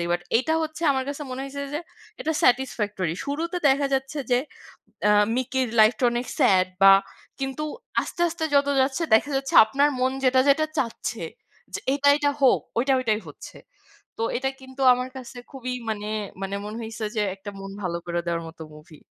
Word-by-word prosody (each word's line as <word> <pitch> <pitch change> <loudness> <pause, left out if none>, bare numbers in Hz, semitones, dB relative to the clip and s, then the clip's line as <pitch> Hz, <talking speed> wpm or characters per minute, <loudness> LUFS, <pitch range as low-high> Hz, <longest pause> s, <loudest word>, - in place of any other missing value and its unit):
দিকে। 170 0 -2
বাট 175 - -4
এইটা 290 +7 +1
হচ্ছে 315 +1 -5
আমার 265 -1 -1
কাছে 285 +1 -5
মনে 255 - -5
হইছে 280 +1 -6
যে 300 - -1 0.4
এটা 320 - -1
satisfactory 210 -9 +1
শুরুতে 320 +5 -3
দেখা 280 +1 +3
যাচ্ছে 270 +3 -2
যে, 245 - +4 0.7
আ - - +5 0.3
মিকির 260 0 -1
লাইফটা 220 +3 +4
অনেক 240 +1 -2
স্যাড 190 -9 +4 0.2
বা 195 0 +10 0.5
কিন্তু 270 +2 -3 0.4
আস্তে, - - -7
আস্তে 325 -1 -4
যত 280 0 +4
যাচ্ছে 265 +5 0
দেখা 285 +6 +3
যাচ্ছে 270 0 -3
আপনার 280 +6 +2
মন 260 +1 +2
যেটা, 260 0 +4
যেটা 310 +3 +4
চাচ্ছে। 235 -4 -3 0.5
যে - - -1
এইটা, 285 0 +2
এইটা 290 -1 +1
হোক 260 - +5 0.2
ওইটা, 270 +3 +2
ওইটাই 220 -4 0
হচ্ছে। - - -11 0.6
তো - - 0
এটা 265 +2 -1
কিন্তু 260 +1 -10
আমার 250 +1 -3
কাছে 250 0 -10
খুবই 255 -2 -5 0.2
মানে, 210 -1 -3 0.3
মানে 195 +1 -3
মনে 215 +2 -6
হইছে 225 0 -7
যে 215 - +1
একটা 195 +1 -9
মন 195 0 -8
ভালো 170 -2 -2
করে 175 0 -2
দেওয়ার 170 -1 -2
মতো 165 0 -12
মুভি। 150 +1 -15
255 Hz, 180 wpm, -24 LUFS, 210-280 Hz, 0.7 s, বা